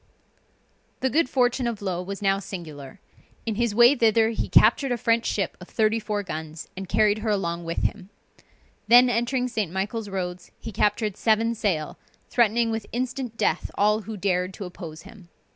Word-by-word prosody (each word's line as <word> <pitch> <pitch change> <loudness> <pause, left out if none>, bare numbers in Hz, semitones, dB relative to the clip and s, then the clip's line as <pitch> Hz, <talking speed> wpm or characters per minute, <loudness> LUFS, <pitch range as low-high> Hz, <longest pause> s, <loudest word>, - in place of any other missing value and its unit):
The 260 - +1
good 310 -1 +2
fortune 245 -1 +1
of 230 -3 -3
Low 185 -3 -2
was 200 +2 -6
now 195 0 +2
singular; 155 -8 -9 0.5
in 225 - -1
his 230 -1 -1
way 240 +3 +7
thither 225 -2 +3
he 225 - -3
captured 250 +4 +4
a 245 - +1
French 230 0 +1
ship 200 - -1
of 180 - -10
34 215 -1 0
guns, 160 -2 -7
and 190 -1 -7
carried 210 0 +3
her 220 0 -2
along 170 -4 -1
with 165 0 -3
him. 200 -3 -2 0.8
Then 245 +1 +7
entering 245 +2 0
St. 215 -8 -2
Michael's 205 +3 -3
roads, 180 -2 -5
he 225 - -7
captured 210 0 0
seven 225 +1 +2
sail, 185 -9 -2 0.3
threatening 235 0 +2
with 225 0 -4
instant 250 -1 -3
death - - 0
all 210 +2 +2
who 215 0 -7
dared 185 -1 -1
to 200 - -6
oppose 165 -3 -9
him. 195 -3 -15
210 Hz, 175 wpm, -25 LUFS, 185-230 Hz, 0.8 s, way